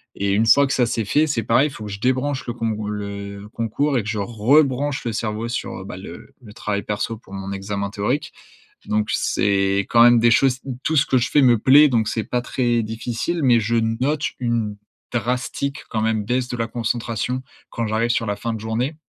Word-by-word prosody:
et 100 0 -1
une 110 +2 +2
fois 140 +4 +6
que 135 - -1
ça, 125 -3 +3
c'est 115 -2 -1
fait, 150 +9 +2
c'est 115 -6 -1
pareil, 130 +6 +3
il - - -12
faut 110 - -8
que 105 - -6
je 100 - -6
débranche 130 +3 0
le 120 - -2
cong 115 -2 -2
le 100 0 -6
concours 130 +5 0
et 110 - 0
que 105 - -5
je 110 - -2
rebranche 135 +6 +2
le 115 - -2
cerveau 110 +1 -3
sur, 120 - -4
heu - - -9
bah, - - -7
le - - -11
le 105 -3 -13
travail 100 -2 -2
perso 105 +2 -3
pour 100 -3 -16
mon 95 0 -5
examen 100 0 -3
théorique. 120 +8 -2 0.5
Donc, 105 0 0
c'est 100 -1 +1
quand 115 0 +6
même 120 -1 +7
des 120 +1 +5
choses 130 +1 +3 0.2
tout 160 - 0
ce 145 - +4
que 130 - +3
je 120 +1 0
fais 145 - +5
me 120 -2 +5
plaît, 145 +5 +7
donc 115 -3 +1
c'est 110 - -1
pas 125 -1 -2
très 120 -2 0
difficile, 120 +9 -3
mais 120 -3 +5
je 115 +2 -1 0.2
note 150 +3 0 0.2
une 115 -4 -1 0.4
drastique, 125 +3 -2
quand 110 - -1
même 110 -1 0
baisse 125 +2 0
de 120 - -4
la 115 -1 -1
concentration 120 +2 -2 0.3
quand 115 -2 -3
j'arrive 115 +2 0
sur 115 - 0
la 105 - -1
fin 115 +3 -3
de 110 - -5
journée. 115 +7 -2
115 Hz, 225 wpm, -21 LUFS, 105-125 Hz, 0.5 s, même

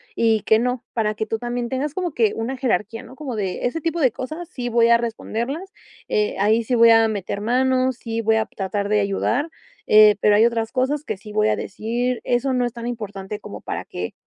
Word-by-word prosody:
y 225 -2 +2
que 220 - +4
no 250 +1 -1
para 215 -2 0
que 220 - -2
tú 220 +1 -3
también 240 0 -3
tengas 270 +3 -2
como 360 -4 -2
que 225 -6 +2
una 240 +4 -3
jerarquía, 225 -3 -1
¿no?, 260 - -13
como 270 -4 -5
de 190 -3 -2
ese 250 +7 -1
tipo 330 +2 -1
de 260 -5 +4
cosas, 310 +8 -6
sí, 250 -7 -4
voy 235 0 +4
a 235 - +7
responderlas, 235 - -4 0.4
eh, 210 0 +1
ahí 215 +3 +3
sí, 250 - 0
voy 230 0 +7
a 225 0 +6
meter 200 -2 -3
manos, 255 +3 +1
sí, 230 -2 -4
voy 220 0 +2
a 220 0 +1
tratar 200 0 -3
de 210 0 +3
ayudar, 200 +10 0 0.4
eh, 215 -1 +7
pero 210 -1 +5
hay 215 +2 +5
otras 230 -1 0
cosas 270 +3 0
que 215 -8 -4
sí 210 +2 -11
voy 215 0 +2
a - - +2
decir: 240 +4 -2
"Eso 250 +2 0
no 250 -1 +1
es 240 - -2
tan 235 -1 -7
importante 210 -3 -5
como - - -9
para - - -4
que 90 0 -5
230 Hz, 225 wpm, -22 LUFS, 215-255 Hz, 0.4 s, a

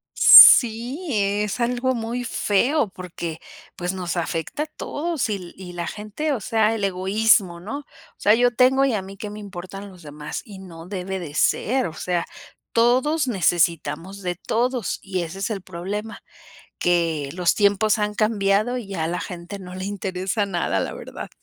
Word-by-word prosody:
Sí, 245 +9 +8
es 205 +1 0
algo 250 +2 0
muy 235 +2 -3
feo 240 +5 +1
porque, 175 -3 -7 0.4
pues, 180 +1 -3
nos 180 -2 -4
afecta 170 - -2
a - - -5
todos 310 0 -3
y 205 - 0
l 180 -2 -11
y 180 -2 -10
la 170 -1 -4
gente, 215 +9 -3
o 250 - -2
sea, 220 +1 +1
el 210 - -4
egoísmo, 195 -1 +2
¿no? 220 +11 -6
O 290 - -14 0.3
sea, 210 +2 +4
yo 245 +1 +3
tengo, 265 +2 +4
y 260 - +1
a 205 - -1
mí 195 +1 -11
que 210 +1 -6
me 210 - -8
importan 195 0 -8
los 180 -3 -15
demás, 150 0 -7
y 200 -4 -11
no 170 -3 -11
debe 190 0 -4
de 155 -4 -8
ser, 250 - +1
o 160 - -8
sea, 175 +1 -2 0.5
todos 260 +6 +2
necesitamos 175 - 0
de 180 -1 -3
todos 240 +4 -1
y 185 -2 -3
ese 170 +4 -7
es 195 - -2
el 200 -4 -4
problema, 195 +5 -6 0.6
que 165 -5 +1
los 180 -1 +1
tiempos 205 +1 +3
han 210 0 -1
cambiado 215 +2 +1
y 200 -5 -7
a 160 -3 -2
la 175 +1 -2
gente 180 +2 -7
no 180 -1 -9
le 185 +1 -5
interesa 195 +1 -2
nada, 175 - -1
la - - -3
verdad. - - -8
200 Hz, 180 wpm, -22 LUFS, 180-225 Hz, 0.6 s, Sí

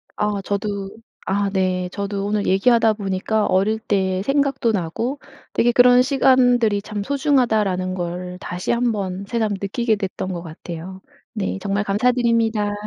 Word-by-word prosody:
아 210 -1 -1
저도 200 -1 -3 0.4
아 200 +1 0
네. 185 -1 0
저도 200 0 -3
오늘 205 0 -1
얘기하다 225 +3 +4
보니까 205 +1 -1
어릴 205 +4 +1
때 190 -4 0
생각도 275 -2 +1
나고 220 - -2 0.3
'되게 240 - +3
그런 245 +1 +6
시간들이 250 -5 +3
참 210 0 -5
소중하다.'라는 220 -10 +1
걸 180 0 -5
다시 180 -1 -4
1 235 0 +1
번 195 -2 -4
새삼 220 -1 -1
느끼게 220 +3 0
됐던 190 -2 -4
것 175 - -5
같아요. 170 +3 -8 0.3
네 205 -4 -2
정말 200 +1 -1
감사드립니다. 225 -1 +1
205 Hz, 295 characters per minute, -21 LUFS, 190-235 Hz, 0.4 s, 그런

